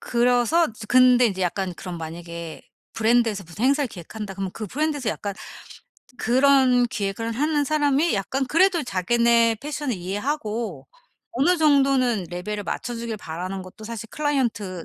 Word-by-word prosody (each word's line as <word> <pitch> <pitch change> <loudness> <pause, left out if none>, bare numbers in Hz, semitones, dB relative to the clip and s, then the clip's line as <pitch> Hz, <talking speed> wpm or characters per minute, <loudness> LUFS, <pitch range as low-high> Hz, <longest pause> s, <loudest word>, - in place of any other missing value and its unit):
그래서 245 +7 +2 0.2
근데 250 -1 +6
인제 190 -3 -2
약간 180 +1 -1
그럼 180 -2 -7
만약에 170 0 -7 0.3
브랜드에서 225 -3 +2
무슨 175 +9 -5
행사를 280 +1 +2
기획한다 195 0 -8
그러면 195 -1 -4
그 215 - -6
브랜드에서 290 - -2
약간 200 -1 -5 0.8
그런 260 -1 +4
기획을 225 +1 -3
하는 295 +4 +1
사람이 295 +1 +2
약간 260 +7 -1
그래도 340 +3 +3
자기네 235 +2 +2
패션을 290 -4 -3
이해하고 215 +5 -3 0.5
어느 320 +9 +2
정도는 270 - +3
레벨을 205 +4 -4
맞춰주길 230 +1 -4
바라는 185 +2 -5
것도 185 +4 -12
사실 225 0 -6
클라이언트 235 - -1
235 Hz, 355 characters per minute, -23 LUFS, 195-275 Hz, 0.8 s, 근데